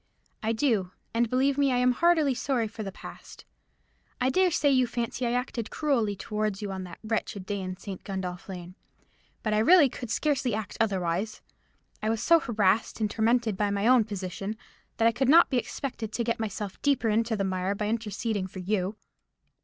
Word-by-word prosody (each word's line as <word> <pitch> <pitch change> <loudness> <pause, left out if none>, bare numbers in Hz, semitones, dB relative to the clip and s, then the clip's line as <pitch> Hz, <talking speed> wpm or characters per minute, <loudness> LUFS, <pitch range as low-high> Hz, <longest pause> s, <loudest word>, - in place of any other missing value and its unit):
"I 220 - 0
do; 220 -7 +1 0.2
and, 230 0 +1
believe 265 +3 +2
me, 280 -1 +3
I 250 - +2
am 250 0 +4
heartily 315 0 +3
sorry 250 -2 0
for 220 +1 -8
the 195 -2 -4
past. - - -12 0.7
I 255 +1 +2
dare 370 +6 +4
say 295 -4 +2
you 255 -2 +3
fancy 240 +1 -2
I 235 - 0
acted 245 -2 -2
cruelly 240 -9 0
towards 210 0 -2
you 205 -2 -4
on 190 -1 -5
that 175 - -10
wretched 215 -3 -2
day 200 0 -3
in 185 0 -5
St. 195 -1 -8
Gundolph 185 -2 -5
Lane; 180 -1 -7 0.7
but 215 -2 0
I 210 - +3
really 295 +5 +6
could 245 -1 -7
scarcely 265 -2 0
act 215 -2 -5
otherwise. 195 0 -1 0.6
I 215 - 0
was 225 0 0
so 335 +4 +6
harassed 215 -5 +1
and 210 -2 0
tormented 230 -1 +2
by 205 +1 0
my 200 +1 -1
own 250 -1 +6
position, 200 +1 -5 0.4
that 230 - +4
I - - +5
could 265 +2 0
not 335 +2 +7
be 260 - +2
expected 240 -3 -4
to 235 - 0
get 230 0 -1
myself 210 -2 -4
deeper 270 -5 +2
into 225 +1 +1
the 200 - 0
mire 190 +1 -1
by 210 +1 -2
interceding 215 -2 -2
for 190 - -12
you. 190 +1 -1
220 Hz, 195 wpm, -28 LUFS, 200-250 Hz, 0.7 s, not